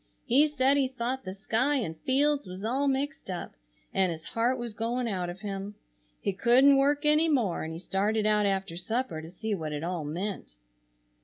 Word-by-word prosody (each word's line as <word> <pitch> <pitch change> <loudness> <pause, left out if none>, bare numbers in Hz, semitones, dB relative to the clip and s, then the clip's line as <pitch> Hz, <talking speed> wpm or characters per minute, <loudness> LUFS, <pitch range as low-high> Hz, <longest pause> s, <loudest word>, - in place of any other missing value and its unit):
He 285 +6 +5
said 280 -1 +2
he 270 -2 +3
thought 255 0 -3
the 185 - -4
sky 230 +8 +1
and 215 - -2
fields 275 - +1
was 185 +2 -8
all 265 +6 0
mixed 275 -2 -2
up 180 -2 -5 0.4
and 190 -2 +2
his 160 -1 -7
heart 240 +3 +1
was 240 -2 -5
going 235 +3 -1
out 185 -5 -2
of 180 +2 -8
him. 200 0 -5 0.4
He 200 - -1
couldn't 255 +7 +5
work 290 +2 +2
any 305 +2 +4
more 235 - +1
and 160 - -4
he 160 - -5
started 205 +4 0
out 210 -1 +3
after 195 -3 -2
supper 185 -2 -2
to 160 - -9
see 210 +5 -4
what 155 -5 -3
it 150 +1 -4
all 175 -2 -2
meant. 170 - -5
220 Hz, 200 wpm, -28 LUFS, 185-265 Hz, 0.4 s, He